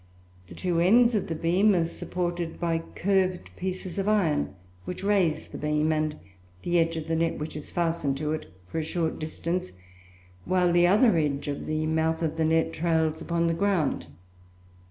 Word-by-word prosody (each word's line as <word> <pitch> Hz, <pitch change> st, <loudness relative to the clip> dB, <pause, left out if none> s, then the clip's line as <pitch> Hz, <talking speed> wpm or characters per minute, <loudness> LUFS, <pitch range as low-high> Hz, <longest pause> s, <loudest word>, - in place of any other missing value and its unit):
The -, -, -11 dB
two 175 Hz, -2 st, 0 dB
ends 235 Hz, +7 st, +5 dB
of 210 Hz, -, 0 dB
the 165 Hz, -, -3 dB
beam 185 Hz, +6 st, +3 dB
are 170 Hz, -2 st, +2 dB
supported 175 Hz, 0 st, -3 dB
by 165 Hz, -1 st, 0 dB, 0.2 s
curved 185 Hz, -1 st, 0 dB
pieces 185 Hz, +1 st, -4 dB
of 195 Hz, -, -1 dB
iron, 160 Hz, -, +1 dB, 0.3 s
which 180 Hz, -, -6 dB
raise 195 Hz, -6 st, +1 dB
the -, -, -8 dB
beam 150 Hz, +1 st, +1 dB
and 155 Hz, -1 st, 0 dB, 0.5 s
the 175 Hz, 0 st, +2 dB
edge 165 Hz, 0 st, +1 dB
of 160 Hz, 0 st, -5 dB
the 165 Hz, -, 0 dB
net 165 Hz, 0 st, 0 dB
which 150 Hz, 0 st, -5 dB
is 150 Hz, -, -6 dB
fastened 165 Hz, -5 st, 0 dB
to 150 Hz, +1 st, -2 dB
it, 155 Hz, -, -6 dB, 0.2 s
for 160 Hz, -, -3 dB
a -, -, -1 dB
short 160 Hz, 0 st, -2 dB
distance, 160 Hz, -, -3 dB, 0.7 s
while 180 Hz, -, +2 dB
the 175 Hz, 0 st, +5 dB
other 210 Hz, 0 st, +5 dB
edge 145 Hz, -3 st, 0 dB
of 140 Hz, -1 st, -4 dB
the 155 Hz, 0 st, -1 dB
mouth 160 Hz, +1 st, 0 dB
of 160 Hz, 0 st, -1 dB
the 160 Hz, -, +2 dB
net 160 Hz, +1 st, +2 dB
trails 160 Hz, -1 st, 0 dB
upon 170 Hz, 0 st, 0 dB
the 165 Hz, -, +2 dB
ground. 170 Hz, -, 0 dB
165 Hz, 185 wpm, -27 LUFS, 155-180 Hz, 0.7 s, ends